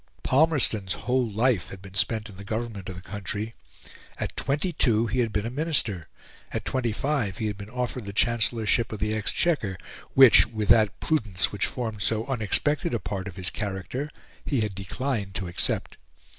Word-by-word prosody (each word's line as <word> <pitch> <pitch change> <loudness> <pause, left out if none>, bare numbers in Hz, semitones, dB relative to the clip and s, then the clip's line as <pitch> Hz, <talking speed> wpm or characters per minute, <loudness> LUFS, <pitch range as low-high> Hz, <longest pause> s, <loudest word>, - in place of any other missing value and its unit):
Palmerston's 130 - +2
whole 125 -1 0
life 110 -1 +1
had 95 - -9
been 95 0 -12
spent 110 +2 +1
in 100 - -12
the 100 - -8
government 110 -3 -4
of 95 - -6
the 90 - -9
country. 105 +2 -4 0.6
At - - -4
twenty 150 +6 0
two 115 -6 +3
he 115 +3 -1
had 115 -3 +1
been 105 0 -1
a 115 - -3
Minister; 125 - -1 0.4
at - - -3
twenty 125 -3 0
five 120 -4 -1
he 110 - -2
had 105 -1 -1
been 100 +1 -9
offered 125 -1 -3
the 100 - -5
Chancellorship 115 +1 +1
of 110 - -4
the 105 +2 -1
Exchequer, 110 - 0 0.4
which, 130 -6 +9
with 110 -3 -3
that 110 -3 +5
prudence 105 - +1
which 100 - 0
formed 110 -5 -4
so 110 +3 +1
unexpected 135 +2 +1
a - - 0
part 95 0 -4
of 95 - -7
his 90 -1 -3
character, 100 - -3 0.3
he 135 -6 0
had 105 -2 -1
declined 100 +1 -3
to 95 -2 -2
accept. 85 - -1
110 Hz, 185 wpm, -26 LUFS, 100-125 Hz, 0.6 s, which